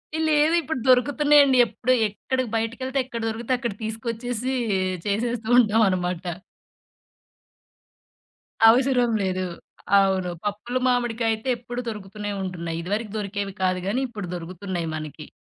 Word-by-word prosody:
ఎ, - - -1
లేవు 305 +1 +3
ఇప్పుడు 315 -4 -3
దొరుకుతున్నాయండి. 280 +2 +5
ఎప్పుడు 255 +3 0
ఎక్కడికి 255 +4 -3
బయటికెళ్తే 255 +4 -2
ఎక్కడ 235 -2 -6
దొరికితే 230 +3 -2
అక్కడ 235 -4 -3
తీసుకొచ్చేసి, 230 +3 -3 0.5
చేసేస్తూ 225 +2 -1
ఉంటాం 225 -2 +4
అనమాట. 180 -1 -1 2.5
అవసరం 250 0 +3
లేదు. 185 -1 -1 0.6
అవును. 190 -2 +1 0.2
పప్పులో 210 +5 -2
మామిడికాయయితే 235 -1 0
ఎప్పుడుూ 245 +1 -6
దొరుకుతూనే 210 -1 -6
ఉంటున్నాయి. 170 -3 -4
ఇదివరకు 205 +4 -3
దొరికేవి 200 -1 -3
కాదు 185 0 +1
గానీ 230 +7 0
ఇప్పుడు 210 -5 -6
దొరుకుతున్నాయి 175 0 -5
మనకి. 155 0 -7
225 Hz, 115 wpm, -24 LUFS, 195-250 Hz, 2.5 s, దొరుకుతున్నాయండి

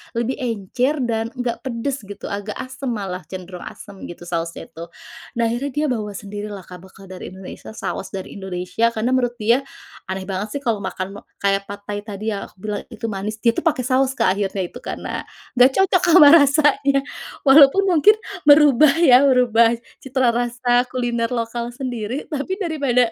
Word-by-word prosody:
lebih 235 +3 -2
encer 250 +5 -1
dan 225 -2 -1
enggak 245 -2 -3
pedes 260 +2 -3
gitu. 205 - -8
Agak 205 +1 -4
asem, 260 +2 -6
malah 195 -6 -3
cenderung 180 -1 -8
asam 200 -2 -11
gitu 175 - -10
sausnya 170 -1 -5
itu. 165 +1 -9 0.5
Nah 235 - 0
akhirnya 265 +4 -3
dia 300 +1 +1
bawa 210 -4 -3
sendiri 205 +1 -6
lah 200 -3 -8
Kak 180 +1 -11
bekal 190 0 -15
dari 185 - -8
Indonesia, 190 +3 -10
saus - - -4
dari 190 - -6
Indonesia. 185 +4 -1
Karena 225 +3 0
menurut 245 -2 +1
dia, 230 +3 +2 0.5
aneh 190 0 -4
banget 195 +4 -4
sih, - - -20
kalau 230 -5 0
makan 190 0 -5 0.2
kayak 200 0 +1
pad 200 0 -8
thai 205 0 -4
tadi 210 +1 -4
ya, 200 - -4
aku - - -24
bilang 210 -1 -3
itu 230 -2 -8
manis, 205 +2 -4
dia 235 - +5
itu - - -3
pakai 300 -6 +1
saus 260 +1 +1
Kak 190 -6 +1
akhirnya 195 -1 -1
itu. - - -10
Karena, - - -5 0.4
enggak 250 +2 +7
cocok 370 -1 +2
sama 300 -5 +9
rasanya, 285 -2 +4 0.4
walaupun 280 +6 +7
mungkin, 360 +6 +6 0.3
merubah 290 -1 +6
ya, 255 -6 +8
merubah 235 -3 +4 0.3
citra 260 -2 +1
rasa 245 +1 +1
kuliner 240 -2 -1
lokal 235 0 -3
sendiri. 250 -1 -4
Tapi 300 +6 -2
daripada, 280 - +1
235 Hz, 175 wpm, -21 LUFS, 200-260 Hz, 0.5 s, sama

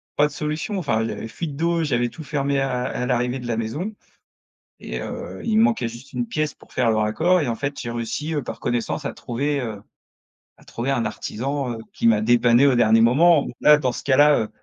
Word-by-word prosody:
pas 145 - +4
de - - -11
solution. 155 +7 -3
Enfin, 120 -11 0
il 110 - -2
y - - -3
avait - - -6
fuite 150 +5 -6
d'eau, 170 +2 0
j'avais 120 -5 0
tout 160 - -10
fermé 140 -1 -1
à 130 -2 -1
à 125 0 -3
l'arrivée 125 +1 0
de 125 - -7
la 115 -2 -1
maison 145 - -3 0.9
et - - -5
heu, - - -7
il 220 -1 +2
me - - +6
manquait 225 - +1
juste 120 +5 -12
une 120 -1 -1
pièce 155 +3 -2
pour - - -20
faire 115 - +2
le 110 - +1
raccord 160 +13 +2
et 150 - -1
en 115 - 0
fait 140 +4 -4
j'ai 120 - -4
réussi, 120 +7 -3
heu, 145 - -1
par - - -7
connaissance 120 -1 -2
à - - -3
trouver, 140 +4 -2
heu, 110 -5 -5 0.8
à - - -20
trouver 120 +3 -4
un 120 -4 0
artisan, 130 +5 -3
heu, - - -6 0.2
qui - - +1
m'a 110 -2 +4
dépanné 120 +3 +4
au 135 - +4
dernier 115 -1 +4
moment. 145 +7 +5 0.2
Là, 150 0 +7
dans 130 -4 0
ce - - -7
cas-là, 145 +2 +5
heu. 110 - -4
130 Hz, 235 wpm, -22 LUFS, 120-150 Hz, 0.9 s, Là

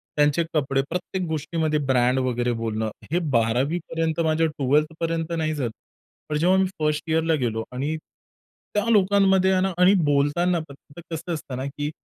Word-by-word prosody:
त्यांचे 150 +3 +3
कपडे 135 -2 +1
प्रत्येक 180 +2 -3
गोष्टीमध्ये 155 0 -1
ब्रँड 125 0 +2
वगैरे 125 -1 0
बोलणं, 110 -1 -2 0.2
हे 175 - +2 0.2
12वी 125 +9 +1
पर्यंत, 165 -1 -1
माझ्या 160 +1 +2
12th 150 +1 +1
पर्यंत 165 0 -2
नाही 155 -1 0
झालं. 130 -6 -2 0.6
पण 150 - 0
जेव्हा 180 +5 +3
मी 190 - +3
फर्स्ट 150 0 0
इअरला 160 +1 +2
गेलो 115 -5 -1
आणि 140 +5 -2 0.8
त्या 210 +1 +1
लोकांमध्ये 195 -2 +4
आहे 185 - +2
ना 190 0 +1
आणि 180 +2 +6
बोलताना 145 +5 +2 0.4
कसं 170 0 -5
असतं 145 -5 -5
ना 130 - -3
की 145 +1 -4
155 Hz, 160 wpm, -24 LUFS, 135-170 Hz, 0.8 s, आणि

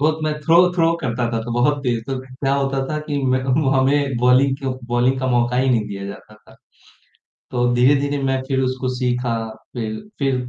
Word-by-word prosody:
बहुत 155 +2 +2
मैं 155 - 0
throw 165 +3 +3 0.2
throw 165 -2 +2
करता 120 -3 -1
था 115 - 0
तो 120 0 -5
बहुत 145 +5 +2
तेज़ 120 -3 0
तो, 135 0 -3
क्या 135 +1 -2
होता 135 -1 0
था 155 - -2
कि 145 -2 -2 0.2
मैं 130 - 0
वो 135 +1 +1
हमें 135 0 +2
बॉलिंग 130 +2 +4
को 135 - -1 0.2
बॉलिंग 125 +2 +2
का 130 - -1
मौका 120 0 +1
ही 130 +1 +2
नहीं 110 -4 +1
दिया 100 -1 -6
जाता 105 +1 -10
था। 105 - -20 1.0
तो 120 -1 +1
धीरे-धीरे 140 +3 +3
मैं 135 -1 0
फिर 135 -1 0
उसको 130 0 -1
सीखा। 125 -1 -1 0.4
फिर 110 -1 -3 0.2
फिर 135 -2 +1
130 Hz, 200 wpm, -20 LUFS, 120-140 Hz, 1.0 s, बॉलिंग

